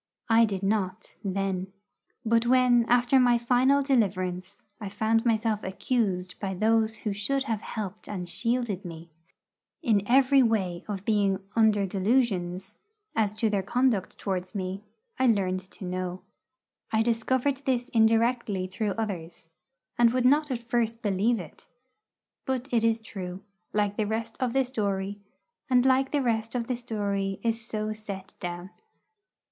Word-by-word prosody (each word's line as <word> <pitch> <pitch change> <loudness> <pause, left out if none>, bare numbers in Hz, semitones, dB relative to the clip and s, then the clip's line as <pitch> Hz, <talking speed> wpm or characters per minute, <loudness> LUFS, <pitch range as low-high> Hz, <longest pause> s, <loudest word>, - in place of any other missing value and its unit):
I 230 0 +6
did 195 -3 -4
not, 195 -1 -1
then. 195 -1 -2 0.5
But 230 +1 +2
when, 250 -2 +4
after 245 +2 +4
my 245 -1 +5
final 255 +4 +3
deliverance, 185 -9 -1 0.2
I 205 -3 -5
found 220 +3 +1
myself 220 -2 +1
accused 190 -2 -1
by 190 -2 -3
those 220 +2 +2
who 210 - 0
should 265 +7 -1
have 225 -6 -2
helped 210 -1 -6
and 185 -4 -4
shielded 230 -1 -1
me 165 -2 -9 0.7
in 215 -4 +3
every 270 +2 +5
way 195 -7 0
of 200 -2 -5
being 200 -3 +2 0.2
'under 215 -3 +4
delusions' 195 -2 0 0.4
as 210 -2 +1
to 220 0 +1
their 200 -2 +1
conduct 230 -1 0
towards 185 0 -3
me, 190 0 -3 0.4
I 260 - +4
learned 190 -5 +2
to 200 - -9
know. 180 0 -4 0.7
I 220 0 +3
discovered 250 +4 +1
this 250 -1 0
indirectly 225 -4 +2
through 195 +2 -2
others, 175 -7 -5 0.5
and 235 -1 +6
would 255 -1 +1
not 295 +3 +4
at 235 -3 -4
first 230 -1 -1
believe 210 +3 +1
it. 170 -4 -11 0.8
But 260 -1 -1
it 230 -2 +2
is 225 0 +2
true, 190 -3 -7 0.3
like 205 -1 0
the 215 -2 0
rest 225 +1 -3
of 250 -2 0
the 270 -1 +2
story, 205 -4 -2 0.5
and 250 -1 +4
like 265 0 +3
the 290 -2 0
rest 225 -1 -1
of 240 -2 -1
the 250 - -1
story 200 -5 -2
is 230 0 0
so 215 -2 -3
set 200 -3 -8
down. 175 +1 -6
220 Hz, 150 wpm, -27 LUFS, 195-240 Hz, 0.8 s, I